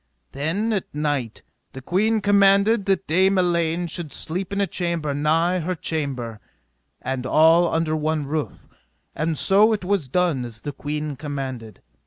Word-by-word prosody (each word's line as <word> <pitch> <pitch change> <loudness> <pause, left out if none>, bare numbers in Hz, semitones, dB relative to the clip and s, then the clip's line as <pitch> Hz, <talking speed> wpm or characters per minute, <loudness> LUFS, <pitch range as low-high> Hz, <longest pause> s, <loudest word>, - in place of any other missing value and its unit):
Then, 180 +11 -1
at 195 -7 -4
night, 145 -6 -2 0.3
the 135 - -8
queen 215 - +1
commanded 200 +1 +4
that 195 0 +1
Dame 190 +4 +3
Elaine 170 -1 +1
should 170 -2 -5
sleep 180 +4 -3
in 200 - -2
a 200 - +3
chamber 170 -6 -2
nigh 165 +5 +1
her 180 +2 -2
chamber, 135 -9 -4 0.6
and 130 -1 -3
all 160 +5 +4
under 160 -1 0
one 155 -1 -1
roof; 150 +1 -4 0.5
and 160 0 -2
so 210 +7 +4
it 205 -4 -3
was 190 -7 0
done 170 -4 +1
as 115 -2 -8
the 145 - -4
queen 150 +1 -4
commanded. 130 -7 -6
160 Hz, 155 wpm, -23 LUFS, 145-185 Hz, 0.6 s, commanded